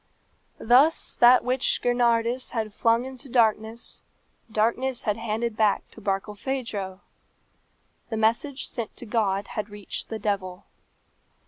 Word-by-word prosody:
Thus 265 Hz, +8 st, +4 dB
that 245 Hz, +1 st, +7 dB
which 255 Hz, +1 st, +1 dB
Gernardus 240 Hz, 0 st, +1 dB
had 220 Hz, -3 st, -2 dB
flung 230 Hz, +3 st, +2 dB
into 265 Hz, +1 st, -9 dB
darkness, 225 Hz, -1 st, +2 dB, 0.5 s
darkness 235 Hz, +4 st, 0 dB
had 210 Hz, -, 0 dB
handed 225 Hz, 0 st, -2 dB
back 215 Hz, -2 st, +1 dB
to 225 Hz, -, -13 dB
Barkilphedro. 205 Hz, 0 st, -3 dB, 1.1 s
The 225 Hz, -, -3 dB
message 235 Hz, +6 st, 0 dB
sent 230 Hz, -3 st, -5 dB
to -, -, -7 dB
God 205 Hz, -3 st, 0 dB
had 210 Hz, 0 st, -4 dB
reached 205 Hz, -1 st, -5 dB
the 220 Hz, -, -3 dB
devil. 195 Hz, -3 st, -3 dB
225 Hz, 120 wpm, -25 LUFS, 210-245 Hz, 1.1 s, that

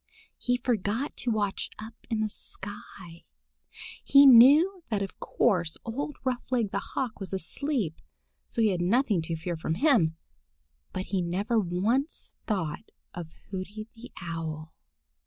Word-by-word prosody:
He 245 Hz, 0 st, +1 dB
forgot 235 Hz, +2 st, -1 dB
to 245 Hz, -, -1 dB
watch 205 Hz, -3 st, -1 dB
up 220 Hz, +1 st, -8 dB, 0.2 s
in 225 Hz, -2 st, 0 dB
the 215 Hz, -, 0 dB
sky. 190 Hz, -5 st, -9 dB, 0.8 s
He 280 Hz, 0 st, +7 dB
knew 290 Hz, +10 st, +8 dB
that 205 Hz, -3 st, 0 dB
of 195 Hz, -, -8 dB
course 175 Hz, -8 st, +1 dB
old 280 Hz, +5 st, -4 dB
Roughleg 250 Hz, -4 st, -1 dB
the -, -, 0 dB
Hawk 250 Hz, -5 st, -4 dB
was 195 Hz, -1 st, -6 dB
asleep, 195 Hz, -, -2 dB, 0.5 s
so 230 Hz, -, 0 dB
he 215 Hz, -, +5 dB
had 180 Hz, -3 st, -1 dB
nothing 210 Hz, 0 st, +2 dB
to 165 Hz, +1 st, -3 dB
fear 170 Hz, +2 st, -3 dB
from 160 Hz, 0 st, -2 dB
him. 180 Hz, -, +3 dB, 0.7 s
But 185 Hz, -, -3 dB
he 190 Hz, -, +2 dB
never 200 Hz, +7 st, 0 dB
once 215 Hz, -, -1 dB
thought 185 Hz, -9 st, -2 dB, 0.2 s
of 170 Hz, -2 st, -6 dB, 0.2 s
Hooty 205 Hz, +3 st, -6 dB
the 240 Hz, +1 st, -12 dB
Owl. 160 Hz, -2 st, -5 dB
210 Hz, 140 wpm, -28 LUFS, 175-245 Hz, 0.8 s, knew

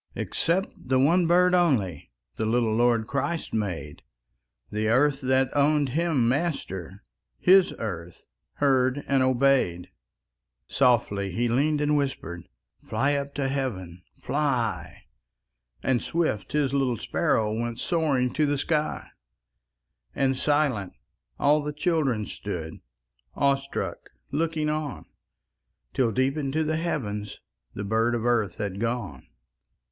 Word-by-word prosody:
Except 180 Hz, +4 st, 0 dB
the 130 Hz, +1 st, -1 dB
one 165 Hz, +6 st, +4 dB
bird 180 Hz, +1 st, +4 dB
only 120 Hz, -, +1 dB, 0.2 s
The 110 Hz, -, -2 dB
little 115 Hz, -1 st, +1 dB
Lord 120 Hz, -1 st, +2 dB
Christ 140 Hz, +7 st, -3 dB
made; 90 Hz, -9 st, -3 dB, 0.7 s
The 105 Hz, +1 st, -1 dB
earth 135 Hz, +5 st, +3 dB
that 130 Hz, 0 st, +1 dB
owned 145 Hz, 0 st, +3 dB
Him 150 Hz, -4 st, +1 dB
Master, 115 Hz, -, -2 dB, 0.3 s
His 190 Hz, 0 st, +5 dB
earth 85 Hz, -6 st, -6 dB, 0.3 s
heard 135 Hz, -1 st, +2 dB
and 135 Hz, -1 st, +2 dB
obeyed. 130 Hz, -9 st, +2 dB, 0.7 s
Softly 110 Hz, -7 st, +1 dB
He 120 Hz, +7 st, 0 dB
leaned 145 Hz, +5 st, +1 dB
and 150 Hz, 0 st, +2 dB
whispered: 105 Hz, -, -3 dB, 0.3 s
"Fly 140 Hz, +2 st, 0 dB
up 140 Hz, 0 st, -3 dB
to 140 Hz, -2 st, 0 dB
Heaven! 100 Hz, -11 st, -3 dB
Fly!" 135 Hz, -7 st, -2 dB, 0.8 s
And 130 Hz, -3 st, +1 dB
swift, 160 Hz, -12 st, -1 dB
His 145 Hz, -3 st, +1 dB
little 135 Hz, -4 st, +1 dB
sparrow 105 Hz, +1 st, 0 dB
Went 115 Hz, +1 st, -3 dB
soaring 145 Hz, -7 st, +1 dB
to 150 Hz, +1 st, +2 dB
the 145 Hz, 0 st, 0 dB
sky, 150 Hz, +1 st, -1 dB, 1.1 s
And 135 Hz, -1 st, +1 dB
silent, 135 Hz, -, +1 dB, 0.4 s
all 150 Hz, +2 st, +3 dB
the 150 Hz, 0 st, -3 dB
children 145 Hz, -8 st, 0 dB
Stood, 85 Hz, -7 st, -6 dB, 0.6 s
awestruck, 140 Hz, 0 st, -1 dB, 0.2 s
looking 155 Hz, +1 st, -1 dB
on, 150 Hz, -3 st, -3 dB, 0.9 s
Till, 120 Hz, -3 st, +2 dB
deep 130 Hz, +6 st, 0 dB
into 150 Hz, +2 st, -1 dB
the 155 Hz, 0 st, -1 dB
heavens, 105 Hz, -11 st, -3 dB, 0.4 s
The 100 Hz, -, -4 dB
bird 115 Hz, +3 st, +1 dB
of 115 Hz, 0 st, -3 dB
earth 120 Hz, -4 st, +1 dB
had 100 Hz, -2 st, -4 dB
gone. 115 Hz, -, -3 dB
130 Hz, 120 wpm, -26 LUFS, 110-150 Hz, 1.1 s, His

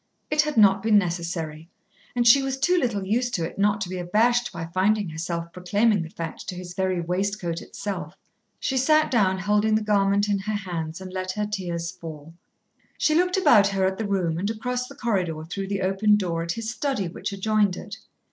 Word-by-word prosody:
It 300 Hz, 0 st, +4 dB
had 300 Hz, -3 st, -3 dB
not 200 Hz, -2 st, +6 dB
been 215 Hz, 0 st, +4 dB
necessary, 170 Hz, -3 st, -2 dB, 0.5 s
and 240 Hz, -1 st, +2 dB
she 240 Hz, +4 st, +7 dB
was 270 Hz, 0 st, -2 dB
too 345 Hz, +7 st, +2 dB
little 235 Hz, -, 0 dB
used 240 Hz, +5 st, 0 dB
to 165 Hz, -, -1 dB
it 170 Hz, -, -8 dB
not 205 Hz, +1 st, +2 dB
to 190 Hz, -, -1 dB
be 185 Hz, 0 st, -4 dB
abashed 235 Hz, +7 st, +2 dB
by 165 Hz, -2 st, -5 dB
finding 190 Hz, +3 st, +1 dB
herself 170 Hz, +1 st, -4 dB
proclaiming 205 Hz, +3 st, +2 dB
the 160 Hz, -, -6 dB
fact 165 Hz, -1 st, -6 dB
to 185 Hz, -, -5 dB
his 180 Hz, -1 st, -8 dB
very 185 Hz, -1 st, 0 dB
waistcoat 180 Hz, 0 st, -2 dB
itself. 205 Hz, -2 st, -6 dB, 0.4 s
She 265 Hz, -, -1 dB
sat 310 Hz, +4 st, +3 dB
down 195 Hz, -6 st, +3 dB
holding 210 Hz, +2 st, +2 dB
the 215 Hz, -, +1 dB
garment 200 Hz, -1 st, +2 dB
in 200 Hz, -1 st, +1 dB
her 215 Hz, +2 st, -3 dB, 0.2 s
hands 165 Hz, +1 st, -4 dB
and 185 Hz, -1 st, -8 dB
let 185 Hz, 0 st, -3 dB
her 210 Hz, +1 st, -1 dB
tears 175 Hz, -5 st, -3 dB
fall. 165 Hz, -3 st, -10 dB, 0.6 s
She 310 Hz, -, +2 dB
looked 360 Hz, +3 st, +2 dB
about 210 Hz, -, +6 dB
her 195 Hz, -1 st, 0 dB
at 190 Hz, +2 st, -1 dB
the 220 Hz, -, -1 dB
room 175 Hz, -5 st, 0 dB
and 200 Hz, +3 st, -1 dB
across 250 Hz, +3 st, -3 dB
the 280 Hz, -, -12 dB
corridor 185 Hz, -, -1 dB
through 195 Hz, +4 st, -5 dB
the 200 Hz, -1 st, -2 dB
open 195 Hz, +3 st, +3 dB
door 175 Hz, -5 st, -1 dB
at 170 Hz, 0 st, -2 dB
his 230 Hz, +1 st, -5 dB
study 255 Hz, -7 st, -2 dB
which 170 Hz, -, -5 dB
adjoined 205 Hz, -1 st, +1 dB
it. 215 Hz, +2 st, -8 dB
195 Hz, 205 wpm, -25 LUFS, 175-220 Hz, 0.6 s, she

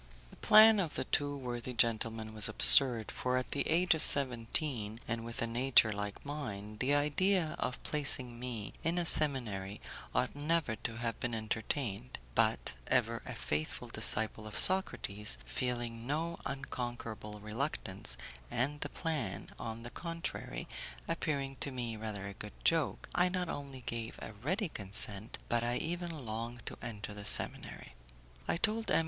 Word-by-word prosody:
The -, -, -14 dB
plan 215 Hz, 0 st, +8 dB
of 170 Hz, -6 st, -2 dB
the -, -, -1 dB
two 145 Hz, 0 st, 0 dB
worthy 125 Hz, -1 st, -5 dB
gentlemen 115 Hz, -1 st, 0 dB
was 110 Hz, -1 st, +2 dB
absurd, 110 Hz, -, +9 dB
for 125 Hz, 0 st, -1 dB
at 130 Hz, -, -3 dB
the 140 Hz, -, -1 dB
age 175 Hz, +2 st, +4 dB
of 160 Hz, -, -2 dB
seventeen, 120 Hz, -3 st, +2 dB
and 115 Hz, 0 st, -3 dB
with 115 Hz, 0 st, -4 dB
a -, -, +1 dB
nature 120 Hz, -1 st, +4 dB
like 105 Hz, +2 st, -5 dB
mine, 110 Hz, -8 st, -6 dB
the 140 Hz, +3 st, +2 dB
idea 160 Hz, +4 st, +1 dB
of 125 Hz, -, -2 dB
placing 130 Hz, -5 st, +1 dB
me 120 Hz, -5 st, -5 dB
in 165 Hz, +2 st, 0 dB
a 175 Hz, -, +1 dB
seminary 110 Hz, -11 st, +3 dB, 0.4 s
ought 125 Hz, +2 st, 0 dB
never 150 Hz, -4 st, 0 dB
to 115 Hz, +2 st, -4 dB
have 115 Hz, -1 st, -3 dB
been 120 Hz, -2 st, -2 dB
entertained, 110 Hz, +1 st, -3 dB, 0.2 s
but -, -, +1 dB
ever -, -, +1 dB
a -, -, -5 dB
faithful 75 Hz, +1 st, -3 dB
disciple 110 Hz, 0 st, 0 dB
of 105 Hz, -, -5 dB
Socrates, 105 Hz, -, +1 dB
feeling 120 Hz, -3 st, -3 dB
no 165 Hz, +4 st, -2 dB
unconquerable 120 Hz, -5 st, -6 dB
reluctance, 110 Hz, -2 st, -3 dB, 0.3 s
and 130 Hz, +5 st, -1 dB
the -, -, -2 dB
plan, 135 Hz, -, -3 dB
on 115 Hz, 0 st, -6 dB
the 120 Hz, -, -8 dB
contrary, 165 Hz, -, -5 dB, 0.4 s
appearing 135 Hz, -3 st, -2 dB
to -, -, -2 dB
me 120 Hz, -4 st, -4 dB
rather 105 Hz, -3 st, -5 dB
a 100 Hz, -, -6 dB
good 105 Hz, +1 st, -9 dB
joke, 165 Hz, -4 st, +2 dB
I 180 Hz, +1 st, +3 dB
not 180 Hz, -2 st, -2 dB
only 140 Hz, -2 st, -6 dB
gave 115 Hz, -1 st, -5 dB
a -, -, -8 dB
ready 170 Hz, -, -2 dB
consent, 100 Hz, -1 st, -2 dB
but 120 Hz, 0 st, +1 dB
I 120 Hz, +1 st, 0 dB
even 170 Hz, -3 st, -4 dB
longed 115 Hz, +2 st, -5 dB
to -, -, -6 dB
enter 110 Hz, -3 st, -6 dB
the 105 Hz, 0 st, -9 dB
seminary. 105 Hz, -, +2 dB, 0.5 s
I -, -, 0 dB
told 220 Hz, +4 st, -1 dB
M. -, -, +4 dB
120 Hz, 160 wpm, -33 LUFS, 110-145 Hz, 0.5 s, absurd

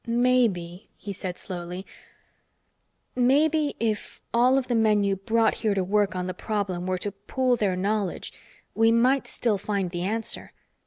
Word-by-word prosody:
"Maybe," 230 Hz, -8 st, +1 dB
he 200 Hz, -, -6 dB
said 180 Hz, -1 st, -5 dB
slowly. 180 Hz, 0 st, -6 dB, 1.3 s
"Maybe, 290 Hz, +4 st, +3 dB
if 220 Hz, -2 st, -2 dB
all 250 Hz, +3 st, +4 dB
of 265 Hz, -, -1 dB
the 245 Hz, -, 0 dB
men 215 Hz, -2 st, +3 dB
you 200 Hz, -1 st, +1 dB
brought 225 Hz, +4 st, +2 dB
here 215 Hz, -3 st, +1 dB
to 190 Hz, -, +1 dB
work 200 Hz, +1 st, +1 dB
on 180 Hz, 0 st, -2 dB
the 185 Hz, -, -3 dB
problem 190 Hz, -5 st, -3 dB
were 185 Hz, 0 st, 0 dB
to 205 Hz, +3 st, -3 dB
pool 245 Hz, +6 st, 0 dB
their 205 Hz, -5 st, 0 dB
knowledge, 200 Hz, +1 st, -2 dB, 0.4 s
we 225 Hz, 0 st, +4 dB
might 255 Hz, +4 st, +3 dB
still 215 Hz, -5 st, 0 dB
find 200 Hz, -3 st, -2 dB
the 175 Hz, -1 st, -3 dB
answer. 220 Hz, +5 st, -3 dB
210 Hz, 160 wpm, -26 LUFS, 185-235 Hz, 1.3 s, all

